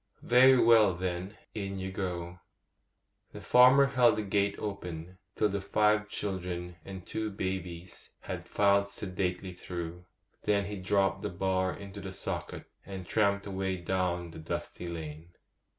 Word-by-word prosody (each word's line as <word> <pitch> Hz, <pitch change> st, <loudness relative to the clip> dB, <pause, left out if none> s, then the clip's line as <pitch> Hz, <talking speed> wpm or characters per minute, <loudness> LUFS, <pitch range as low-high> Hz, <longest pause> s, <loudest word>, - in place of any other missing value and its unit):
'Very 130 Hz, +2 st, +7 dB
well, 110 Hz, -6 st, +6 dB
then, 90 Hz, +3 st, -4 dB, 0.2 s
in 100 Hz, -2 st, -4 dB
you 95 Hz, 0 st, -4 dB
go.' 90 Hz, -2 st, -4 dB, 0.9 s
The -, -, -7 dB
farmer 130 Hz, +3 st, +7 dB
held 125 Hz, -3 st, +4 dB
the 110 Hz, -, -2 dB
gate 100 Hz, 0 st, +1 dB
open 90 Hz, -4 st, -6 dB, 0.2 s
till 105 Hz, -, +3 dB
the 100 Hz, 0 st, -2 dB
five 105 Hz, +1 st, +2 dB
children 90 Hz, -4 st, -4 dB
and 95 Hz, -2 st, -8 dB
two 110 Hz, -1 st, -3 dB
babies 90 Hz, -3 st, -5 dB
had -, -, -6 dB
filed 100 Hz, 0 st, +3 dB
sedately 95 Hz, -2 st, -3 dB
through; 90 Hz, 0 st, -6 dB, 0.4 s
then 100 Hz, -1 st, +1 dB
he 105 Hz, +1 st, -5 dB
dropped 95 Hz, +1 st, +1 dB
the -, -, -2 dB
bar 95 Hz, +1 st, 0 dB
into 100 Hz, 0 st, -9 dB
the 95 Hz, -, -6 dB
socket, 95 Hz, -, -4 dB, 0.2 s
and 95 Hz, -2 st, -7 dB
tramped 100 Hz, 0 st, +1 dB
away 95 Hz, -1 st, -2 dB
down 90 Hz, -1 st, -1 dB
the 80 Hz, -, -9 dB
dusty 85 Hz, +2 st, -5 dB
lane. 80 Hz, 0 st, -7 dB
95 Hz, 145 wpm, -30 LUFS, 90-100 Hz, 0.9 s, Very